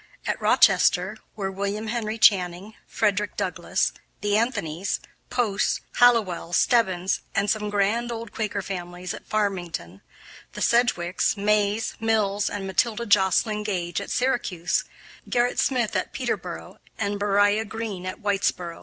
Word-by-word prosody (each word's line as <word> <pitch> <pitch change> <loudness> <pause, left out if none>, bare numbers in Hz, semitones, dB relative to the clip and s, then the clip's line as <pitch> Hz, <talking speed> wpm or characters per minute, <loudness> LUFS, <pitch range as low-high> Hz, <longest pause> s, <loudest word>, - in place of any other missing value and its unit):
At - - -2
Rochester 190 +4 +4 0.2
were 195 -2 -3
William 200 +3 -3
Henry 220 -1 -2
Channing, 190 -1 +3
Frederick 210 -1 0
Douglass, - - -1 0.3
the 205 0 +1
Anthonys, 205 -7 -1 0.3
Posts, 230 -5 0 0.2
Hallowells, 210 -8 +3
Stebbins, 190 -6 +2 0.2
some 210 0 0
grand 210 +4 +1
old 230 -1 -6
Quaker 205 -2 -3
families 180 -1 -5
at - - -10
Farmington, 175 - -2 0.5
the - - -7
Sedgwicks, 215 -6 +2
Mays, 210 +1 +1
Mills, 210 -3 +1
and 200 -1 -4
Matilda 220 +4 0
Joslyn 205 +1 +3
Gage 180 -5 -2
at - - -7
Syracuse; 240 -9 0 0.4
Gerrit 245 0 +1
Smith 240 -5 +1
at - - -2
Peterboro, - - -4 0.2
and 205 -2 -2
Beriah 205 +1 +3
Green 205 -3 -5
at 185 - -6
Whitesboro. 180 -4 -1
205 Hz, 125 wpm, -25 LUFS, 190-220 Hz, 0.5 s, Rochester